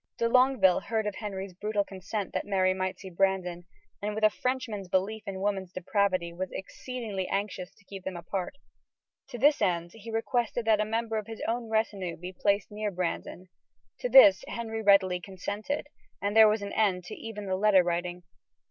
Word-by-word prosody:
De 230 Hz, -, +2 dB
Longueville 250 Hz, -7 st, +4 dB
heard 220 Hz, -2 st, -2 dB
of 210 Hz, -, -1 dB
Henry's 195 Hz, -3 st, -5 dB
brutal 210 Hz, +2 st, -1 dB
consent 195 Hz, +1 st, -5 dB
that -, -, -1 dB
Mary 185 Hz, -2 st, +2 dB
might 185 Hz, 0 st, -2 dB
see 190 Hz, -2 st, -9 dB
Brandon, 180 Hz, -1 st, 0 dB, 0.4 s
and, 210 Hz, +1 st, -2 dB
with 215 Hz, -, -3 dB
a 215 Hz, -, +6 dB
Frenchman's 250 Hz, -6 st, -3 dB
belief 195 Hz, +4 st, 0 dB
in 190 Hz, -1 st, -4 dB
woman's 195 Hz, -3 st, -1 dB
depravity, 185 Hz, -2 st, 0 dB
was 185 Hz, +2 st, -4 dB
exceedingly 210 Hz, -2 st, -5 dB
anxious 195 Hz, -2 st, -3 dB
to 205 Hz, -, -25 dB
keep 195 Hz, -1 st, -9 dB
them 190 Hz, -2 st, -4 dB
apart. 180 Hz, +7 st, -4 dB, 0.7 s
To 250 Hz, -, -7 dB
this 290 Hz, +5 st, +4 dB
end 170 Hz, -1 st, +1 dB
he 225 Hz, 0 st, -11 dB
requested 230 Hz, +1 st, -1 dB
that 215 Hz, -1 st, +4 dB
a -, -, +1 dB
member 225 Hz, +1 st, -1 dB
of 210 Hz, -, -8 dB
his 225 Hz, -1 st, -7 dB
own 235 Hz, 0 st, -2 dB
retinue 205 Hz, -6 st, -1 dB
be 180 Hz, +2 st, -7 dB
placed 200 Hz, +2 st, 0 dB
near 210 Hz, 0 st, -2 dB
Brandon. 180 Hz, 0 st, -4 dB, 0.5 s
To -, -, -2 dB
this 200 Hz, -, +8 dB
Henry 225 Hz, -1 st, -4 dB
readily 195 Hz, -3 st, +4 dB
consented, 200 Hz, +8 st, -4 dB, 0.3 s
and 205 Hz, +1 st, -2 dB
there 220 Hz, -1 st, +9 dB
was 210 Hz, -1 st, 0 dB
an 200 Hz, -, -5 dB
end 190 Hz, -4 st, +2 dB
to 175 Hz, -, -8 dB
even 215 Hz, -2 st, -7 dB
the 190 Hz, -1 st, 0 dB
letter 195 Hz, -1 st, +5 dB
writing. 175 Hz, +1 st, -2 dB
200 Hz, 185 wpm, -29 LUFS, 185-220 Hz, 0.7 s, there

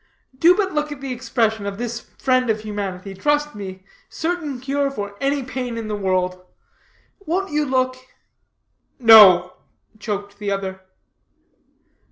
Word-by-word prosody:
"Do 335 Hz, +7 st, +5 dB
but 390 Hz, -4 st, 0 dB
look 300 Hz, 0 st, -1 dB
at 290 Hz, -, -7 dB
the 270 Hz, -1 st, -4 dB
expression 225 Hz, -4 st, -1 dB
of 200 Hz, 0 st, -5 dB
this 235 Hz, 0 st, -4 dB, 0.2 s
friend 255 Hz, -2 st, +1 dB
of 215 Hz, -1 st, 0 dB
humanity. 200 Hz, -3 st, -5 dB
Trust 295 Hz, +8 st, 0 dB
me, 190 Hz, -2 st, -8 dB, 0.2 s
certain 320 Hz, -5 st, -3 dB
cure 275 Hz, +2 st, -1 dB
for 205 Hz, -6 st, -6 dB
any 275 Hz, 0 st, 0 dB
pain 250 Hz, -2 st, -5 dB
in 225 Hz, -1 st, -5 dB
the 210 Hz, -, -2 dB
world. 185 Hz, -2 st, -1 dB, 0.8 s
Won't 370 Hz, +2 st, -1 dB
you 300 Hz, 0 st, +1 dB
look?" 255 Hz, -1 st, 0 dB, 1.0 s
"No," 205 Hz, -7 st, +8 dB, 0.5 s
choked 205 Hz, -1 st, -5 dB
the 205 Hz, -1 st, -3 dB
other. 190 Hz, -1 st, -3 dB
230 Hz, 140 wpm, -21 LUFS, 200-275 Hz, 1.0 s, No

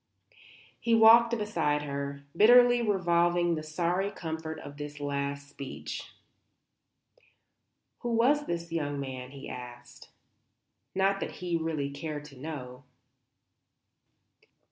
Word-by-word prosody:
He 230 Hz, -1 st, +2 dB
walked 230 Hz, +1 st, +7 dB
beside 165 Hz, -9 st, 0 dB
her, 140 Hz, 0 st, -4 dB
bitterly 245 Hz, +4 st, +7 dB
revolving 175 Hz, -4 st, +2 dB
the 155 Hz, -, -2 dB
sorry 175 Hz, +5 st, -1 dB
comfort 160 Hz, -3 st, -5 dB
of 145 Hz, 0 st, -10 dB
this 145 Hz, 0 st, -7 dB
last 140 Hz, 0 st, -3 dB
speech. 140 Hz, -1 st, -7 dB, 1.9 s
"Who 240 Hz, -, -4 dB
was 280 Hz, +6 st, +3 dB
the 170 Hz, -, 0 dB, 0.2 s
young 145 Hz, -3 st, -2 dB
man?" 130 Hz, -2 st, -6 dB
he 140 Hz, 0 st, -10 dB
asked. 120 Hz, 0 st, -10 dB, 0.9 s
Not 195 Hz, +1 st, +2 dB
that -, -, -4 dB
he 175 Hz, -1 st, -3 dB
really 160 Hz, -4 st, -2 dB
cared 150 Hz, +1 st, -5 dB
to 145 Hz, -2 st, -13 dB
know. 130 Hz, -2 st, -7 dB
160 Hz, 110 wpm, -29 LUFS, 140-195 Hz, 1.9 s, walked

